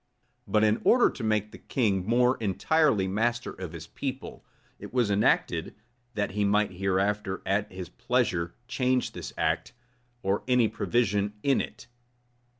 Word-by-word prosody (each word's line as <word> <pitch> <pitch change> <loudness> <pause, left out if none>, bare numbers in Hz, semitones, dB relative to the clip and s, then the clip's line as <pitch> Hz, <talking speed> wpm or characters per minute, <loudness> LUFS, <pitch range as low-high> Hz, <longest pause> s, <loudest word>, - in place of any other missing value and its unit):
But 105 0 +2
in 110 0 +2
order 245 0 +5
to - - -8
make 105 -1 0
the - - -12
king 100 -7 0
more 125 +2 +3
entirely 110 - +2
master 120 +5 0
of 90 -3 -7
his 80 -2 -8
people, 135 +7 -6 0.4
it - - -9
was 120 -5 +1
enacted, 100 +1 +1 0.4
that 105 -2 -1
he 105 +1 0
might 105 0 +2
hereafter, 95 +1 -1
at 100 +2 0
his 90 -2 -7
pleasure, 85 -1 -1
change 130 -1 0
this - - -7
act, - - 0 0.5
or 95 +1 +1
any 125 -3 +4
provision 105 -2 0
in 140 -2 +3
it. 115 +2 -8
105 Hz, 150 wpm, -28 LUFS, 95-120 Hz, 0.5 s, order